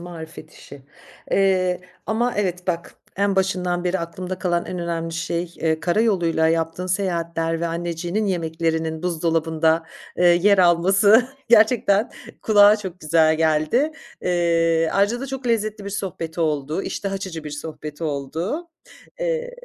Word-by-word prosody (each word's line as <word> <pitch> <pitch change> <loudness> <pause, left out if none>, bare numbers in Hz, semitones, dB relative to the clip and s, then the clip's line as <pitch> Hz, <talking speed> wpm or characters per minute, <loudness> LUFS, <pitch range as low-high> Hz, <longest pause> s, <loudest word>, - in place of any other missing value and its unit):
marifet 160 -2 -10
işi, 140 -1 -13 0.5
eee, 185 -2 +2 0.3
ama, 235 +3 0
evet, 180 -3 -2
bak 170 -2 -3 0.2
en 200 0 +1
başından 180 -2 0
beri 185 +1 0
aklımda 180 +2 -5
kalan 175 -2 0
en 180 - -5
önemli 165 -1 -3
şey, 170 +1 -3
eee, 160 -1 0
kara 175 +5 +1
yoluyla 170 -7 +2
yaptığın 165 +2 -1
seyahatler 170 -3 -1
ve 170 - 0
anneciğinin 175 +4 -2
yemeklerinin 160 -2 -2
buzdolabında, 160 -1 +1 0.3
eee, 180 - +1
yer 180 +4 +5
alması 195 +7 +5 0.2
gerçekten 220 -2 +4 0.3
kulağa 205 -1 +6
çok 190 -3 -8
güzel 160 0 +3
geldi. 160 - +1 0.3
Eee, 165 -2 +2
ayrıca 205 +5 +1
da 275 - -4
çok 265 -1 -6
lezzetli 215 -2 -1
bir 200 - -5
sohbet 175 -5 -5
oldu. 155 +1 -1
İştah 195 -1 -4
açıcı 190 -5 -5
bir 150 - -6
sohbet 150 +1 -7
oldu. 160 - -3 0.5
Eee, - - -1
175 Hz, 135 wpm, -22 LUFS, 165-200 Hz, 0.5 s, kulağa